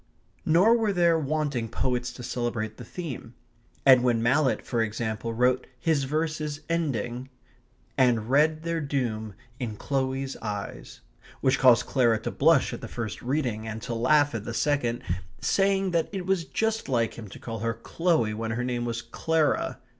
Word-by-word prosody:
Nor 185 +9 +5
were 220 -2 +1
there 170 -3 +3
wanting 145 -6 -1
poets 125 0 -1
to 125 - -9
celebrate 120 -3 -3
the 125 - -8
theme. 125 -3 -7 0.5
Edwin 125 -3 +5
Mallett, 130 +3 +2
for 120 -2 0
example, 110 +1 -2
wrote 125 +2 +1
his 155 -4 +1
verses 155 0 -2
ending: 130 -6 -2 0.3
/* 120 - -38
And 120 -4 +3
read 155 +4 +3
their 170 -1 -1
doom 115 -8 -2 0.2
in 115 -5 -3
Chloe's 135 +2 -2
eyes, 105 -2 -6 0.2
*/ - - -23
which 130 0 +2
caused 125 -3 +6
Clara 120 -4 +3
to - - -3
blush 155 -1 +3
at - - -6
the - - -6
first 115 -4 -5
reading, 120 -5 -1
and 110 0 -4
to 120 - -3
laugh 145 +5 +3
at 110 -3 -3
the 115 - -5
second, 130 -5 0 0.4
saying 195 -1 +2
that 170 -1 +1
it 190 -3 -4
was 190 -3 +1
just 220 -5 -1
like 115 -3 +1
him 110 -2 -9
to 95 - -11
call 115 -1 -6
her 115 +2 -1
Chloe 120 -2 0
when 110 +1 -3
her 115 +2 -2
name 120 -1 -2
was 115 -1 -3
Clara. 155 +6 0
130 Hz, 170 wpm, -27 LUFS, 115-155 Hz, 0.5 s, caused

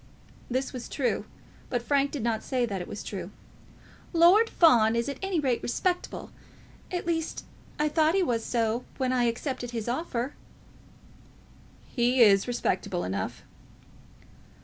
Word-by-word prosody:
This 260 +2 -1
was 250 -2 -6
true, 265 -4 -1 0.4
but 245 -1 -1
Frank 280 +2 +2
did 275 -6 -5
not 230 -2 0
say 250 -2 0
that 200 -5 -4
it 175 - -6
was 205 - -6
true. 190 -3 -5 0.8
"Lord 360 +7 +6
Fawn 230 -9 +5
is 235 +2 0
at 280 - -4
any 385 -3 0
rate 260 -5 0
respectable. 360 +8 -2 0.6
At 355 -1 -2
least, 325 -2 -2 0.3
I 300 - +2
thought 315 +2 +2
he 390 - +3
was 235 -8 0
so 230 0 0
when 255 -1 0
I 245 -1 +2
accepted 245 +1 -2
his 230 -2 -4
offer." 255 0 -2 1.5
"He 245 +1 +1
is 200 -1 +5
respectable 200 -6 -1
enough." 95 0 -4
250 Hz, 145 wpm, -28 LUFS, 230-305 Hz, 1.5 s, Lord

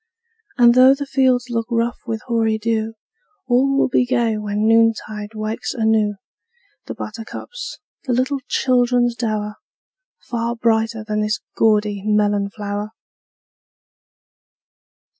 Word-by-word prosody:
And 240 -1 +6
though 260 +2 +7
the 285 +1 -5
fields 255 -2 +1
look 230 -1 -1
rough 235 0 0
with 225 -1 -3
hoary 225 -2 +1
dew, 225 0 -2 0.5
All 265 +2 +2
will - - +3
be 250 - +2
gay 240 -3 +1
when 210 0 -1
noontide 225 -1 +1
wakes 215 +1 -4
anew 220 -3 +2 0.7
The - - -5
buttercups, 230 - -7 0.3
the 255 - 0
little 260 +3 0
children's 245 -1 +2
dower 215 -3 -3 0.6
Far 235 0 -3
brighter 225 -1 0
than 215 -1 -1
this 210 0 -1 0.2
gaudy 210 -2 +2
melon 205 -1 +1
flower! 205 +1 -5
225 Hz, 120 wpm, -20 LUFS, 215-245 Hz, 0.7 s, though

